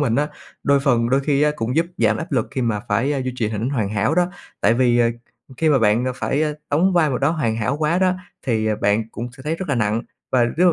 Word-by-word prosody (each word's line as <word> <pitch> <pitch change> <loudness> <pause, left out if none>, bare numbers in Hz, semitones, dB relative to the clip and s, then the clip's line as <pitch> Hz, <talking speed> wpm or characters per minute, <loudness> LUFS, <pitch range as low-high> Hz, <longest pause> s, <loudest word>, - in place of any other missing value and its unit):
mình 120 -6 +1
á, 150 +1 +1 0.3
đôi 140 -1 +3
phần 120 -4 +2
đôi 135 +2 +3
khi 140 0 +1
á 150 - +4
cũng 115 +4 -2
giúp 165 +1 +3
giảm 110 -2 +3
áp 160 +4 -6
lực 125 -5 0
khi 135 -2 -2
mà 110 -3 0
phải 130 +7 +1
duy 130 - -2
trì 110 -4 0
hỉnh 110 +4 -2
hoàn 115 -8 -1
hảo 105 +7 0
đó, 175 0 +3 0.3
tại 110 +3 +4
vì, 120 -1 +3
ờ, 115 -1 +4 0.5
khi 160 - +1
mà 145 - +4
bạn 115 +1 +3
phải 145 +4 0 0.3
đóng 175 +6 +3
vai 165 -4 +3
m 130 - -1
đó 140 +3 +2
hoàn 115 -9 -1
hảo 125 +5 -1
quá 155 +3 +1
đó, 185 -1 +3 0.3
thì, 110 -3 +1
ờ, 110 -1 +1
bạn 105 +2 +1
cũng 120 +2 -5
sẽ 130 - -12
thấy 155 +4 -2
rất 185 -2 -6
là 140 - +1
nặng 110 0 0 0.3
và 125 -2 +4
lúc 175 +9 +3
130 Hz, 265 wpm, -21 LUFS, 115-150 Hz, 0.5 s, á